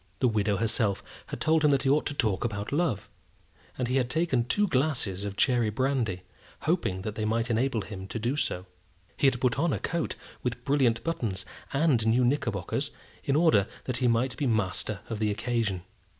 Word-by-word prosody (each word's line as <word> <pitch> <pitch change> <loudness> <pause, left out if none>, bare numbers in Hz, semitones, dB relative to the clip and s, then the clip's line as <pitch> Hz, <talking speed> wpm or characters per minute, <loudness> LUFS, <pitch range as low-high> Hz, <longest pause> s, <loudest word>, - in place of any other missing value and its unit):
The 130 - +3
widow 105 -3 +1
herself 105 -2 0 0.2
had - - -6
told 160 0 +3
him 150 - +6
that 140 -1 +3
he 135 - +2
ought 150 +2 +2
to 145 - -3
talk 110 -8 +1
about 105 -3 -3
love; 145 - 0 0.7
and 125 - -1
he 130 +2 +1
had 125 -2 +1
taken 155 -5 +1
two 205 +11 +2
glasses 130 - 0
of 100 0 -5
cherry 120 -4 +3
brandy, 115 -6 0 0.4
hoping 155 - 0
that 105 - -3
they 110 - -3
might 115 +2 0
enable 115 0 +1
him 95 -2 -7
to 105 - -4
do 120 +5 -1
so. 90 -10 -2 0.5
He 140 - +3
had 130 -2 +2
put 125 -1 +1
on 170 -1 +2
a - - 0
coat 170 -2 -2 0.3
with 120 -1 -3
brilliant 135 -5 +2
buttons, 110 - -2 0.3
and 140 -6 +2
new 120 +3 +4
knickerbockers, 115 - 0 0.3
in 135 - +1
order 155 - +4 0.2
that 130 -2 -2
he 125 - +2
might 120 +2 +2
be 145 - 0
master 105 -2 0
of 110 -2 -4
the 110 -1 +1
occasion. 105 -3 -1
120 Hz, 195 wpm, -28 LUFS, 105-140 Hz, 0.7 s, him